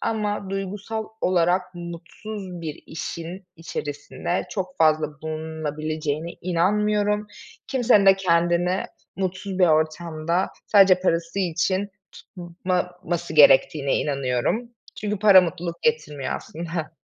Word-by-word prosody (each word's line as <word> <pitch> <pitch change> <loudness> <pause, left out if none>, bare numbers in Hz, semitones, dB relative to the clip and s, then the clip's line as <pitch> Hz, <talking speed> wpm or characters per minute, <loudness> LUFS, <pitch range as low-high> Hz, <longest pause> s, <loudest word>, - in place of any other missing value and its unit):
ama 210 -3 -2
duygusal 205 +3 -4
olarak 180 0 +2
mutsuz 175 +2 -8
bir 155 -2 -6
işin 170 +3 -6
içerisinde 165 +3 -4
çok 185 -1 -4
fazla 155 -1 +4 0.2
bulunulabileceğine 155 0 -3
inanmıyorum. 210 +4 +1 0.4
Kimsenin 240 -6 +4
de 195 0 +8
kendini 175 0 +2 0.3
mutsuz 190 0 -3
bir 180 - +6
ortamda, 160 +2 0 0.2
sadece 195 -3 +6
parası 170 0 0
için 185 +2 0 0.2
tutmaması 175 -1 -4
gerektiğine 140 -1 +5
inanıyorum. 140 - -1 0.3
Çünkü 210 -1 -2
para, 200 -2 +8
mutluluk 170 -1 -4
getirmiyor 150 - -1
aslında. 165 -1 -5
175 Hz, 100 wpm, -24 LUFS, 160-195 Hz, 0.4 s, de